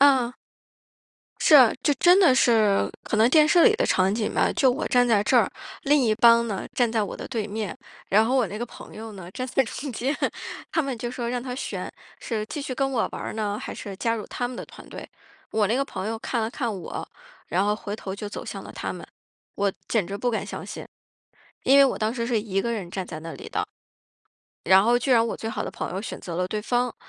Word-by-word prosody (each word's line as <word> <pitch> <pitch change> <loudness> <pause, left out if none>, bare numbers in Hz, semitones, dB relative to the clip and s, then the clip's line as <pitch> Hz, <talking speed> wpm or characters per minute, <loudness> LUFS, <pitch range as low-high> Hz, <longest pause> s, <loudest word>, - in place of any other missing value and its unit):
嗯。 260 -4 +5 1.1
是 310 - +5
啊， 255 -6 +8
就 295 - +3
真 355 +6 +5
的 335 -9 +6
是 220 -6 +3
可 - - -2
能 220 +2 +5
电 305 +3 +6
视 340 +2 +5
里 435 - +6
的 - - +1
场 185 +1 +2
景 220 -2 -1
吧， - - +2
就 265 - +3
我 275 +6 -2
站 245 0 +4
在 215 -4 +3
这 - - +3
儿， - - +4 0.3
另 295 0 +4
一 220 -3 +3
帮 235 +1 +6
呢， 200 -4 -4
站 240 -2 +2
在 225 -1 +1
我 205 - -4
的 - - -7
对 225 -5 -2
面， 215 +1 -4 0.3
然 215 +3 +5
后 250 +4 +1
我 250 -4 +3
那 200 +3 -6
个 240 - -2
朋 240 - -13
友 220 0 -8
呢， 185 -3 -10
站 255 +6 -4
在 270 +1 +2
中 270 +3 -6
间。 260 +6 -1 0.6
他 325 - +2
们 275 -4 -3
就 240 +1 -4
说 240 -1 -4
让 245 0 -2
他 250 -1 -5
选， 260 - -5 0.3
是 220 -3 -3
继 290 - -5
续 260 - -4
跟 270 +1 0
我 235 -4 +1
玩 - - -6
儿 - - -4
呢？ 210 -1 -2
还 - - -6
是 200 - -7
加 230 +3 0
入 215 -2 -5
他 245 - -3
们 250 - -8
的 - - -6
团 - - -14
队？ - - -8 0.4
我 215 -1 +2
那 225 +5 +1
个 275 - +1
朋 195 - -5
友 225 0 -3
看 235 +1 -2
了 220 - -1
看 240 -3 -2
我， - - -6 0.4
然 185 +3 +1
后 210 0 +2
回 205 -1 -5
头 190 -3 -6
就 205 +1 -6
走 - - -7
向 - - -6
了 - - -10
他 - - -4
们。 - - -9 0.5
我 200 -1 +1 0.2
简 210 -7 +1
直 200 - -4
不 245 +4 0
敢 225 - -2
相 - - -6
信， - - -8 0.8
因 275 +1 +5
为 275 - +9
我 265 - +1
当 215 +1 0
时 235 -2 -3
是 235 -3 +1
一 195 -2 -1
个 235 +3 -1
人 195 -6 -4
站 190 0 -4
在 155 -2 -7
那 165 +1 -7
里 - - -9
的。 - - -1 1.0
然 190 +2 +6
后 240 +3 +3
居 255 +3 -2
然 230 -2 +5
我 - - -3
最 225 - -5
好 215 -1 -3
的 - - -4
朋 - - -5
友 190 - -3
选 215 - -6
择 170 -2 -6
了 180 +1 -1
对 210 +2 -2
方， 245 +2 0
230 Hz, 275 characters per minute, -25 LUFS, 210-255 Hz, 1.1 s, 为